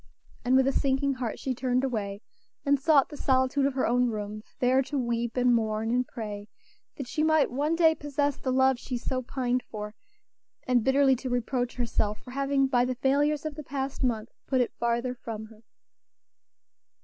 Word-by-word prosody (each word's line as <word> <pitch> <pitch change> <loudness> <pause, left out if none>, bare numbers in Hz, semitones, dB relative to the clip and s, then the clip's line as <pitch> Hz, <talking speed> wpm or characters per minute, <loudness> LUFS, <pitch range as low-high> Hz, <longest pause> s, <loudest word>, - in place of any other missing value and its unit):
And 250 +1 +3
with 265 0 +5
a 270 - +3
sinking 275 0 +1
heart 250 -4 -4
she 265 - -2
turned 255 +1 0
away 205 -6 -2 0.4
and 285 0 +3
sought 280 -1 +4
the - - -8
solitude 260 +1 +2
of 275 - -3
her 260 - +1
own 245 +1 +2
room, 210 -1 -5 0.2
there 255 +1 +3
to 280 +2 -3
weep, 235 -1 -1
and 250 0 +4
mourn, 220 -1 0
and 250 +1 +1
pray 210 -2 -6 0.5
that 275 - -5
she 305 - -2
might 315 -3 +3
one 295 +6 0
day 325 -1 +5
possess 290 -2 -1
the 260 - -3
love 260 -1 +3
she 250 0 -4
so 255 +1 -2
pined 250 0 -1
for, 210 -3 -7 0.7
and 245 -3 +2
bitterly 265 +1 +4
to 255 +1 -5
reproach 245 0 -1
herself 215 -3 -1
for 250 - -13
having 275 +1 +1
by 250 -2 +2
the 255 0 -1
failures 290 +4 +1
of 310 - -3
the 305 - -7
past 270 0 -4
month 230 -3 0 0.2
put 260 - +1
it 245 - 0
farther 235 +1 0
from 225 -3 -7
her. 220 0 -17
255 Hz, 190 wpm, -28 LUFS, 235-275 Hz, 0.7 s, with